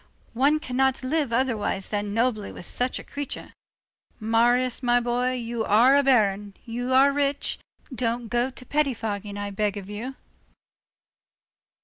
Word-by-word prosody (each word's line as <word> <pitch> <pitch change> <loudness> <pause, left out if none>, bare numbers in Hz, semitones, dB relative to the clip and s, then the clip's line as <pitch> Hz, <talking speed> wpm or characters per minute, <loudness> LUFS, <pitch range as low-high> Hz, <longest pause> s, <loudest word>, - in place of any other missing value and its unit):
one 280 +6 +3
cannot 265 -1 0
live 285 -1 0
otherwise 230 -6 -1
than 205 -1 -2
nobly 225 -1 0
with - - -10
such 250 +1 -1
a - - -7
creature. 285 -1 -6 0.7
Marius, 240 +3 +2
my 245 -1 +3
boy, 245 +1 0
you 235 -2 -3
are 235 +6 +5
a 285 - +5
Baron, 205 -7 +2
you 245 +2 -3
are 270 +2 +6
rich, 285 0 -1 0.3
don't 235 -1 -2
go 240 +3 0
to 255 -1 -11
pettifogging, 225 -8 -1
I 205 0 -4
beg 205 0 -1
of 200 0 -8
you." 240 +6 -5
240 Hz, 140 wpm, -25 LUFS, 215-260 Hz, 0.7 s, are